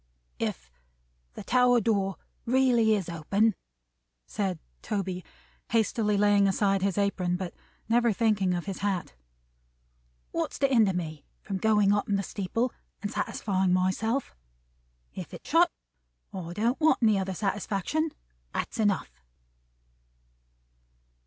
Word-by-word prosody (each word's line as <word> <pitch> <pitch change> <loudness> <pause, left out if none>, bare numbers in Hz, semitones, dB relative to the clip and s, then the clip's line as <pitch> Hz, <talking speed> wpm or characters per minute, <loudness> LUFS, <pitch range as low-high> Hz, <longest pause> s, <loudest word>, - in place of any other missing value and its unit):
"If - - -3 0.6
the - - -7
tower 250 -1 +4
door 200 -3 +1 0.3
is - - -2
really 240 -5 +4
open," 195 +7 +1 0.7
said 190 - -2 0.2
Toby, 190 -4 -3 0.5
hastily 220 -2 +1
laying 205 -1 +4
aside 195 0 +2
his 195 0 0
apron, 195 -3 +1
but 180 -1 -5 0.3
never 235 +1 +3
thinking 200 -4 +2
of 175 - -3
his 195 -2 -5
hat, 195 - -2 1.2
"what's - - -2
to 275 - +3
hinder 225 -7 +4
me 155 -4 -4 0.2
from 195 - -3
going 210 0 +3
up 205 0 0
in 200 - +2
the 200 - 0
steeple 220 +6 -2 0.3
and 205 - -2
satisfying 190 -3 0
myself? 210 +8 0 0.8
If - - -7
it's - - -12
shut, - - +5 0.6
I 175 -3 -5
don't 230 +7 0
want 305 -6 +3
any 215 -3 +4
other 190 0 -3
satisfaction. 205 - -1 0.4
That's - - -3
enough." 205 - 0
200 Hz, 125 wpm, -28 LUFS, 190-225 Hz, 1.2 s, shut